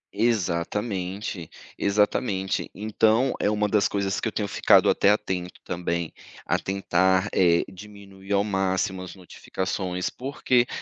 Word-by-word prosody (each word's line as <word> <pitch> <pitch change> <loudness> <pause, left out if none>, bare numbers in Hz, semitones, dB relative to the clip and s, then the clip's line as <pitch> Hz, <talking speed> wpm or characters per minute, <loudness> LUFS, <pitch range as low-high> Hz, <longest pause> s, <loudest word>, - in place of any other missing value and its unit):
Exatamente, 100 -3 -1 0.3
exatamente. 100 -1 0
Então 110 +4 +2
é - - +2
uma 105 0 +1
das 105 -1 +2
coisas 100 -1 -1
que - - -2
eu 110 - -2
tenho 105 -2 -2
ficado - - +4
até 100 - +4
atento 90 -3 -1
também 85 -2 -3 0.3
a - - +1
tentar, 95 0 +1
eh, 85 -2 +4
diminuir 100 0 -12
ao 100 0 +3
máximo 95 -2 -1
as 90 0 -8
notificações, 90 0 -4
porque 125 -2 +1
100 Hz, 130 wpm, -25 LUFS, 95-105 Hz, 0.3 s, ficado